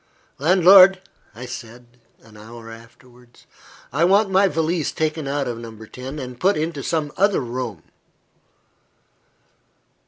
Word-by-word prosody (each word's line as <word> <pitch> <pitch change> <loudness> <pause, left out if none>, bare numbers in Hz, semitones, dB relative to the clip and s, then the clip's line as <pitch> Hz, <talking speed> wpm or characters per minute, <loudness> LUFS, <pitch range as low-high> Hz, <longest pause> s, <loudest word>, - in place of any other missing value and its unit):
"Landlord," 185 +4 +6 0.5
said 120 -1 -10 0.4
I, - - -18
an 105 - -18
hour 115 +2 -12
afterwards, 120 +1 -18 0.5
"I 155 - +1
want 195 +3 +3
my 195 +1 +4
valise 165 -1 -1
taken 155 -2 -3
out 140 0 -2
of 120 -1 -5
No. 115 -1 -10
10, 130 +6 -9
and 125 -3 -8
put 195 +4 +2
into 155 -1 -3
some 150 +1 -2
other 200 +1 +2
room." 120 -7 -6
140 Hz, 125 wpm, -21 LUFS, 120-170 Hz, 0.5 s, Landlord